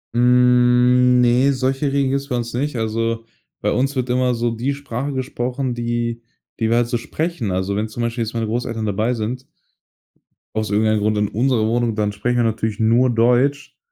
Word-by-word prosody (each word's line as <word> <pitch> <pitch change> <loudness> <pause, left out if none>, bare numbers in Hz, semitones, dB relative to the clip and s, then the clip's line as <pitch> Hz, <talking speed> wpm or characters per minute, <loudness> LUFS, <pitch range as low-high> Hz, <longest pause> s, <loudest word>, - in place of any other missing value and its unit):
Hm, 125 0 +4
ne, 125 +3 +3
solche 135 +2 -1
Regeln 140 -1 +1
gibt 140 0 0
es 140 - -12
bei 125 - -2
uns 120 -1 -3
nicht. 140 +3 -2
Also, 115 0 -2 0.4
bei - - 0
uns 135 +2 0
wird 130 -1 -2
immer 125 -1 +1
so 120 0 -1
die 120 +5 -2
Sprache 140 0 -4
gesprochen, 130 0 -3
die 120 0 -2 0.4
die 110 0 +1
wir 115 - +3
halt 120 -1 +2
so 120 -1 -1
sprechen. 155 - -3
Also, 95 +2 -1
wenn 105 +2 -1
zum 115 +2 -6
Beispiel 115 0 -2
jetzt 115 +1 -6
meine 115 -1 -1
Großeltern 115 0 -3
dabei 110 +4 0
sind, 120 +4 -4 1.0
aus 110 -1 -2
irgendeinem 110 +1 +2
Grund 105 0 0
in 105 -1 0
unserer 120 -1 +1
Wohnung, 115 0 0
dann 105 -1 0
sprechen 120 +4 -1
wir 120 - +3
natürlich 110 -1 -1
nur 115 +3 +3
Deutsch 125 +5 +1
120 Hz, 195 wpm, -20 LUFS, 110-125 Hz, 1.0 s, Hm